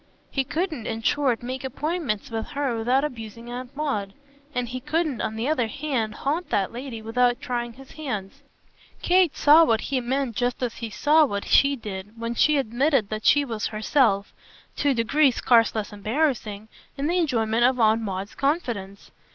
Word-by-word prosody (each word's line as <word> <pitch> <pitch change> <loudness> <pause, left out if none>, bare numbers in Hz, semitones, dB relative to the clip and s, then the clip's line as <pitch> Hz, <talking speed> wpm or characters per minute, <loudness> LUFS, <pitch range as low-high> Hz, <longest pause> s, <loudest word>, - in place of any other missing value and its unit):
He 270 - 0
couldn't 310 - -3
in 225 0 -4
short 260 -3 +1
make 255 +2 -5
appointments 265 - -3
with 225 -1 -3
her 275 -4 -1
without 245 +5 +1
abusing 230 -3 -6
Aunt 250 +2 -7
Maud, 210 -10 -2 0.4
and 250 -1 -1
he 255 +2 -5
couldn't 310 -3 -1
on 220 - -2
the 225 +4 -2
other 260 -7 +1
hand 250 -4 -2
haunt 315 +6 -2
that 195 -2 0
lady 240 -2 -7
without 245 +2 +2
tying 240 -1 -3
his 270 +2 -14
hands. 215 -11 -5 0.6
Kate 360 -3 +3
saw 305 +3 +7
what 225 -8 +3
he 265 -2 -1
meant 255 -1 -1
just 245 +2 -1
as 240 -2 -3
he 230 -1 -5
saw 300 +9 +4
what 200 -8 -2
she 280 0 +4
did 210 -1 -8
when 230 0 -3
she 300 +5 +3
admitted 260 -2 +1
that 215 0 -3
she 290 -1 +5
was 225 -5 -3
herself, 215 -2 +1 0.4
to 290 - +1
a - - +4
degree 275 +6 +3
scarce 235 -2 +3
less 215 -1 -3
embarrassing, 215 -2 -1 0.3
in 275 - -2
the 350 +4 +1
enjoyment 230 -7 +1
of 250 +1 +3
Aunt 220 0 +4
Maud's 195 -1 -4
confidence. 240 - -2
245 Hz, 180 wpm, -24 LUFS, 220-280 Hz, 0.6 s, saw